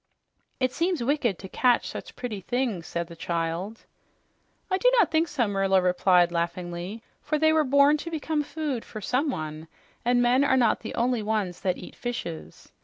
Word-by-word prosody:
"It 255 -1 +1
seems 340 -3 0
wicked 245 - +1
to 190 - -9
catch 245 +5 +2
such - - -8
pretty 225 -6 -5
things," 230 -5 -2
said 170 0 -3
the 170 0 -12
child. 170 +5 -3 0.9
"I 375 - +2
do - - +5
not 395 -8 +4
think 320 +1 +2
so," 275 -7 0
Merla 195 -1 +2
replied 180 -1 +3
laughingly, 175 +4 -3 0.2
"for 305 +1 -1
they 315 +1 +4
were 315 -1 +4
born 280 +2 +5
to 335 - -6
become 315 -1 -1
food 295 -4 -3
for 215 - -8
someone, 165 - -2 0.4
and 245 +1 +3
men 245 +3 +4
are 265 -2 +3
not 235 -4 +3
the 220 - -7
only 240 -1 +1
ones 210 -4 -2
that 185 -2 0
eat - - -10
fishes. 80 - -6
235 Hz, 180 wpm, -26 LUFS, 180-285 Hz, 0.9 s, do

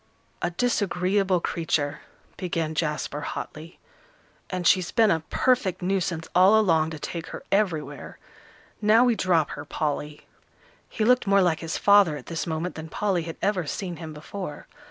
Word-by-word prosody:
"A 175 - 0
disagreeable 195 -3 +1
creature," 160 -4 -1 0.4
began 165 -4 -2
Jasper, 150 -2 -2
hotly; 155 +3 -7 0.7
"and 180 -1 -3
she's 185 0 +3
been 220 -3 +4
a 160 - +2
perfect 245 -9 +1
nuisance 180 -3 -1
all 190 +4 +6
along 165 -6 +3
to 160 - -6
take 165 +2 -5
her - - -8
everywhere. 185 -7 -1 0.6
Now 220 +3 +5
we 245 - +4
drop 175 -7 +1
her, - - -6
Polly." 150 0 -3 0.6
He 215 - -1
looked 250 -2 +3
more 200 -1 +5
like 170 -3 +1
his 165 0 -3
father 200 -7 +5
at 130 - -11
this 165 0 -4
moment 165 +2 -2
than 160 0 -8
Polly 195 0 0
had 165 - -7
ever 190 -6 0
seen 180 +1 -4
him 160 -1 -7
before. 155 +1 -7
175 Hz, 155 wpm, -25 LUFS, 160-200 Hz, 0.7 s, all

